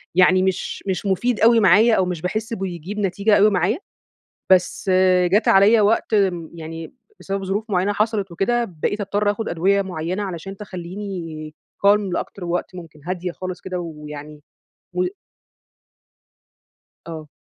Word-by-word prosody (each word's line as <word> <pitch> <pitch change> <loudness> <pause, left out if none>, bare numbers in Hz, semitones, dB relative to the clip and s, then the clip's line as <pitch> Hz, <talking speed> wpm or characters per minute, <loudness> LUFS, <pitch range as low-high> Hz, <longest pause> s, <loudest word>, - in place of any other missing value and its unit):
يعني 185 +1 +5
مش 190 -1 -2
مش 190 +1 -2
مفيد 215 +5 0
أوي 230 +1 +6
معايا 215 +4 +5
أو 185 - +2
مش 180 -3 -4
باحس 220 +6 -3
بيجيب 190 +1 -5
نتيجة 200 +2 +2
أوي 210 +2 +6
معايا. 200 +4 +1 0.7
بس 185 +1 +2 0.4
جات 210 +3 +3
عليَّ 210 +3 +6
وقت، 215 +2 +2
امم، 185 -6 +1
يعني 165 0 -8 0.3
بسبب 195 0 -4
ظروف 200 +3 -2
معينة 195 +1 +1
حصلت 210 -3 -1
وكده، 235 +7 0 0.2
بقيت 205 - 0
أضطر 205 +1 +1
آخد 220 +2 -4
أدوية 195 +4 +2
معينة 185 +2 -3
علشان 195 +1 -6
تخليني 175 -5 -7 0.3
calm 205 +1 +6
لأكتر 185 - -4
وقت 175 +1 -3
ممكن 165 -4 -11
هادية 180 -1 -3
خالص 185 +1 -6
كده 185 -1 -4
ويعني 150 -2 -8 0.5
و 365 - 0 2.0
آه. 160 -2 -7
190 Hz, 140 wpm, -21 LUFS, 175-205 Hz, 2.0 s, أوي